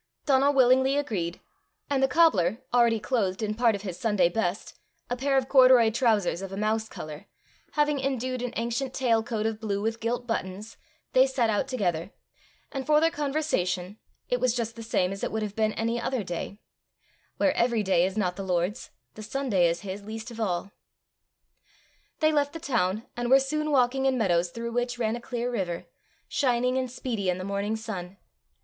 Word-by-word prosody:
Donal 275 0 +4
willingly 260 +1 +4
agreed, 190 -12 -2 0.5
and 275 -2 0
the 270 - +4
cobbler, 245 - +3
already 235 -2 +4
clothed 205 -4 -1
in 210 0 -1
part 230 -1 +3
of 200 - -7
his 180 -3 -6
Sunday 205 -6 +2
best, 185 0 -3 0.3
a - - +1
pair 270 +2 +1
of 260 -1 +1
corduroy 255 -4 +6
trousers 215 -7 +1
of 195 -1 -6
a 195 - -5
mouse 220 +1 0
colour, 155 -1 -8 0.5
having 295 -1 +2
indued 255 -2 -2
an 250 -1 -3
ancient 235 +3 -2
tail 235 -4 +2
coat 220 -1 -3
of 220 -1 -1
blue 205 -3 -2
with 225 +2 -2
gilt 240 +2 -2
buttons, 210 -2 -4 0.4
they 260 +1 +6
set 245 -4 +1
out 210 +5 0
together; 185 -9 -1 0.6
and 270 -2 -5
for 300 0 +5
their 325 +1 +3
conversation, 220 - -1 0.3
it 250 - 0
was 250 -1 +1
just 230 -2 -2
the 230 - -8
same 185 -5 0
as 195 0 -6
it - - -1
would 220 0 -2
have 205 -1 -5
been 215 -1 +1
any 230 +1 -1
other 250 -2 -1
day: 175 +2 -5 0.8
where 290 - +3
every 235 -2 +1
day 185 -3 +3
is 190 +3 -1
not 180 -4 0
the 195 - -5
Lord's, 185 +5 -1 0.2
the 215 - -10
Sunday 215 -6 +1
is 170 0 -1
his 195 0 -6
least 220 +3 -7
of 230 - -9
all. 195 -2 -2 1.5
They 310 0 +4
left 290 -1 +1
the 330 - -6
town, 225 - 0
and 240 0 -2
were 270 +1 +7
soon 305 +3 -1
walking 265 -1 +2
in 260 -1 +2
meadows 175 -6 +2
through 235 +5 -5
which 245 +1 -1
ran 225 -1 0
a 240 - -7
clear 245 0 -3
river, 180 -7 -3 0.4
shining 250 -2 +1
and 260 -1 -1
speedy 230 -6 -3
in 180 - 0
the 185 - -5
morning 200 +2 -2
sun. 200 -4 -6
230 Hz, 195 wpm, -27 LUFS, 200-255 Hz, 1.5 s, were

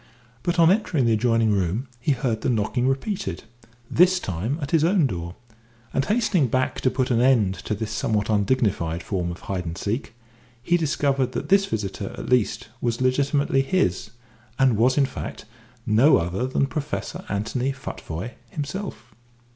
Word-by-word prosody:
But 175 +6 -1
on 165 0 +6
entering 180 - +1
the 115 - +3
adjoining 115 0 +2
room 100 +6 0
he 140 +4 +1
heard 120 -4 -1
the - - 0
knocking 120 +2 0
repeated 135 - -2 0.4
this 185 +5 +4
time 100 - -3
at 140 -3 -5
his 160 -2 +3
own 175 -1 +3
door; 85 -7 -4 0.6
and 135 - +1
hastening 200 - +2
back 130 +2 -1
to 130 - +3
put 130 0 -1
an 120 -1 +3
end 120 -7 +4
to 105 - -1
this 105 +1 -4
somewhat 110 -1 0
undignified 100 -6 +1
form 90 -4 -2
of 85 - -7
hide 95 -2 -3
and 85 +1 -5
seek, 115 +3 -3 0.5
he 175 - +2
discovered 140 -5 +1
that - - -4
this 195 0 +4
visitor 105 +1 -4
at - - -6
least 120 -1 +1
was 120 -1 -1
legitimately 135 +2 +2
his, 130 - 0 0.5
and 130 -3 +4
was, 125 +5 +3
in 140 - +5
fact, 130 - -7 0.4
no 120 +7 +5
other 90 +9 -1
than 130 +1 +1
Professor 150 +1 -4
Anthony 115 +6 -1
Futvoye 105 -5 -6 0.2
himself. 160 - -6
125 Hz, 165 wpm, -24 LUFS, 105-140 Hz, 0.6 s, on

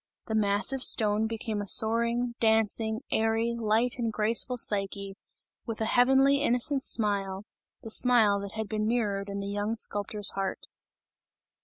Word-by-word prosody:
The 220 - -5
massive 215 +5 +1
stone 215 -3 +4
became 220 -1 -5
a 205 - -7
soaring, 235 +3 +2
dancing, 220 0 0
airy, 225 +1 0
light 230 +2 -1
and 230 -2 -2
graceful 225 +4 -1
Psyche, 200 -3 -2 0.5
with 225 -2 -5
a 220 - -1
heavenly, 270 +4 +3
innocent 270 +1 +2
smile, 200 -4 -1 0.4
the 225 - -8
smile 225 -5 +3
that 200 0 -8
had 220 -1 -5
been 215 0 -3
mirrored 205 -4 -2
in 200 0 -5
the 200 - -6
young 205 +2 -3
sculptor's 205 -1 0
heart. 195 0 -5
220 Hz, 145 wpm, -27 LUFS, 205-235 Hz, 0.5 s, stone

